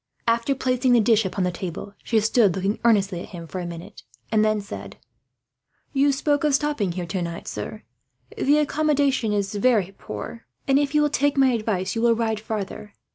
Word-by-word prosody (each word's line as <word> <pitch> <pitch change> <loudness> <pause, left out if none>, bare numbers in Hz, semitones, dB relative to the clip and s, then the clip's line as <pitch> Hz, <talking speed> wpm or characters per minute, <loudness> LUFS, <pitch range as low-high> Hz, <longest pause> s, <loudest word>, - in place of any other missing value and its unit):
After 230 +4 +2
placing 255 -1 +1
the 240 - +6
dish 225 -1 +3
upon 190 0 -2
the 180 - +1
table, 180 +3 -6
she 225 - +2
stood 215 -3 +3
looking 195 +2 -1
earnestly 200 -6 +3
at - - -9
him 170 -2 -8
for 185 +3 -6
a 175 - -4
minute, 175 +4 -9 0.3
and 215 -1 +3
then 215 0 +2
said: 200 - -8 1.0
"You 280 +1 +3
spoke 290 +1 0
of 295 -2 +3
stopping 275 - 0
here 180 0 -4
tonight, 170 -1 -4
sir. 105 +1 -6 0.5
The 290 +2 +3
accommodation 285 -5 +1
is 200 0 -1
very 205 -3 +2
poor 105 - -8 0.2
and, 270 0 +4
if 290 0 -1
you 300 - +5
will 295 - +1
take 285 -1 +1
my 265 -1 +5
advice, 215 -5 -1
you 225 - -2
will 235 -1 +4
ride 220 -2 -1
farther. 210 -1 -5
220 Hz, 190 wpm, -24 LUFS, 195-270 Hz, 1.0 s, the